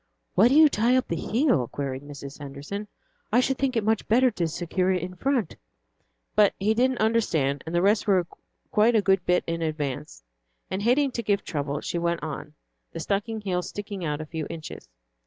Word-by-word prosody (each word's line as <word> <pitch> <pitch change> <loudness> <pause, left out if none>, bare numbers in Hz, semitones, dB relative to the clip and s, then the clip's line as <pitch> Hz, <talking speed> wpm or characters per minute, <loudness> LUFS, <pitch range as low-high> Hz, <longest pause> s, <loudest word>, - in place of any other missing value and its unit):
"Why 200 +6 +6
do 265 - +3
you 310 0 +9
tie 240 -1 +2
up 255 - +1
the 170 - 0
heel?" 225 - +1
queried 135 -1 -4
Mrs. 140 -1 -9
Henderson. 145 +9 -6 0.4
"I - - +5
should 265 +1 +1
think 270 -2 0
it 225 - +1
much 220 0 0
better 250 +3 +4
to 175 -6 -1
secure 180 +3 -1
it 180 -2 0
in 180 0 -5
front." 250 - -1 0.8
But 210 -2 +4
he 210 +3 +2
didn't 255 +2 +2
understand, 165 - +1
and 165 - -3
the 175 - +2
rest 205 +2 +3
were 185 -3 +3 0.5
quite 225 +3 +4
a 215 - +4
good 190 -2 +3
bit 180 0 +3
in 165 0 -3
advance, 150 - -4 0.5
and 190 - -2
hating 260 +5 +3
to 235 - -3
give 205 -2 0
trouble, 145 -2 -3
she 170 - -2
went 170 -1 -1
on, 150 0 -6 0.4
the 165 - -6
stocking 205 +6 -2
heel 185 -3 -1
sticking 200 0 -6
out 150 -2 -2
a - - -5
few 155 -1 -5
inches. 165 -2 -8
190 Hz, 200 wpm, -26 LUFS, 155-225 Hz, 0.8 s, you